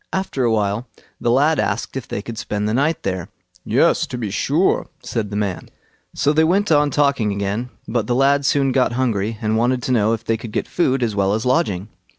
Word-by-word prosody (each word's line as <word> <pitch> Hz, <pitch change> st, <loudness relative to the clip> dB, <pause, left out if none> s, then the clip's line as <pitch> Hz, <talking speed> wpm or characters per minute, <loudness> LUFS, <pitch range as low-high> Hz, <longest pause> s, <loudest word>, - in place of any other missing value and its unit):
After 190 Hz, -8 st, -2 dB
a 120 Hz, -, +2 dB
while, 105 Hz, +2 st, 0 dB, 0.3 s
the 120 Hz, -, 0 dB
lad 145 Hz, +6 st, +3 dB
asked -, -, -2 dB
if 135 Hz, -, -5 dB
they 100 Hz, -, -4 dB
could 115 Hz, -1 st, -6 dB
spend 105 Hz, 0 st, -2 dB
the 110 Hz, -, 0 dB
night 145 Hz, +6 st, +1 dB
there. 95 Hz, 0 st, -3 dB, 0.3 s
"Yes, 165 Hz, +7 st, +2 dB
to 125 Hz, -, -5 dB
be 110 Hz, -5 st, -3 dB
sure", 145 Hz, -, +1 dB, 0.2 s
said 110 Hz, -4 st, -3 dB
the 100 Hz, -, -5 dB
man. 100 Hz, -4 st, -3 dB, 0.5 s
So 145 Hz, -, +2 dB
they 160 Hz, +1 st, +4 dB
went 190 Hz, +4 st, +2 dB
on 145 Hz, -1 st, +4 dB
talking 140 Hz, -7 st, +1 dB
again, 100 Hz, +5 st, -2 dB, 0.2 s
but 115 Hz, -2 st, -1 dB
the 120 Hz, -, +1 dB
lad 140 Hz, +2 st, +3 dB
soon 135 Hz, -1 st, +2 dB
got 125 Hz, -2 st, +2 dB
hungry, 115 Hz, -4 st, -1 dB
and 110 Hz, +1 st, +1 dB
wanted 125 Hz, +2 st, +1 dB
to -, -, -1 dB
know 110 Hz, -2 st, +3 dB
if 115 Hz, 0 st, -4 dB
they 115 Hz, -, +1 dB
could 115 Hz, 0 st, -8 dB
get -, -, -1 dB
food 135 Hz, -7 st, +1 dB
as 110 Hz, -3 st, -1 dB
well 100 Hz, 0 st, +2 dB
as 110 Hz, -, -3 dB
lodging. 120 Hz, -, +1 dB
120 Hz, 220 wpm, -20 LUFS, 105-140 Hz, 0.5 s, they